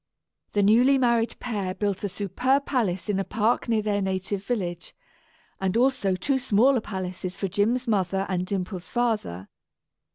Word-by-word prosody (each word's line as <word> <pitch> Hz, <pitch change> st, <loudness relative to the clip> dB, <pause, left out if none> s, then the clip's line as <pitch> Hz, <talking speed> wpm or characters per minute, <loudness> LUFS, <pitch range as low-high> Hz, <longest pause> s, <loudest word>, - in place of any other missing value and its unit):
The 205 Hz, -, +2 dB
newly 245 Hz, +7 st, +5 dB
married 235 Hz, -3 st, +2 dB
pair 200 Hz, -6 st, -3 dB
built 205 Hz, -2 st, -2 dB
a 205 Hz, -, -1 dB
superb 250 Hz, +9 st, 0 dB
palace 195 Hz, -10 st, -1 dB
in 205 Hz, -2 st, 0 dB
a -, -, 0 dB
park 225 Hz, +4 st, 0 dB
near 220 Hz, -2 st, +2 dB
their 205 Hz, -1 st, 0 dB
native 190 Hz, +1 st, -2 dB
village, 180 Hz, -7 st, -3 dB, 0.6 s
and 190 Hz, +2 st, 0 dB
also 245 Hz, -7 st, +2 dB
two 265 Hz, +9 st, 0 dB
smaller 250 Hz, +1 st, +3 dB
palaces 185 Hz, -2 st, -5 dB
for 195 Hz, -, -2 dB
Jim's 230 Hz, +7 st, 0 dB
mother 195 Hz, -3 st, +1 dB
and 180 Hz, -2 st, -1 dB
Dimple's 185 Hz, -2 st, -4 dB
father. 215 Hz, -, -1 dB
205 Hz, 155 wpm, -25 LUFS, 190-240 Hz, 0.6 s, newly